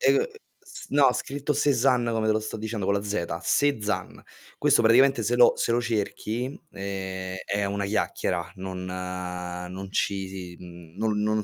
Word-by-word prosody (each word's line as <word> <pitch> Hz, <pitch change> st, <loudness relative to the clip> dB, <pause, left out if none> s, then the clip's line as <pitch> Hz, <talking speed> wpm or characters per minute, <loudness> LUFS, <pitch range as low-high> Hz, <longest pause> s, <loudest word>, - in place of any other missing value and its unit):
E -, -, +5 dB
uhm, 450 Hz, -, +3 dB, 0.3 s
s -, -, -11 dB
no, 140 Hz, -2 st, +5 dB
scritto 145 Hz, +2 st, -2 dB
Sezan 130 Hz, -3 st, +3 dB
come 110 Hz, -1 st, 0 dB
te 110 Hz, -, +4 dB
lo 110 Hz, -, +2 dB
sto 110 Hz, +1 st, -5 dB
dicendo, 110 Hz, -2 st, -3 dB
co' -, -, +2 dB
la 100 Hz, 0 st, +1 dB
zeta: 85 Hz, -5 st, -2 dB
"SE 145 Hz, -4 st, +2 dB
ZAN". 105 Hz, -, -3 dB, 0.4 s
Questo -, -, +4 dB
praticamente 120 Hz, +2 st, +5 dB
se 120 Hz, +3 st, +1 dB
lo 120 Hz, -, +6 dB
se -, -, 0 dB
lo 120 Hz, +1 st, +2 dB
cerchi 115 Hz, 0 st, -2 dB
n 140 Hz, -, -9 dB, 0.2 s
ehm, 95 Hz, -1 st, -4 dB
è 100 Hz, 0 st, 0 dB
una 100 Hz, 0 st, -1 dB
chiacchiera, 90 Hz, -3 st, -1 dB
non 95 Hz, -1 st, -5 dB
non 90 Hz, 0 st, -5 dB
ci 95 Hz, -2 st, 0 dB
si 90 Hz, -2 st, -8 dB
mhmm, 85 Hz, -1 st, -12 dB
non 105 Hz, -1 st, 0 dB
non 110 Hz, 0 st, +1 dB
100 Hz, 185 wpm, -26 LUFS, 95-115 Hz, 0.4 s, lo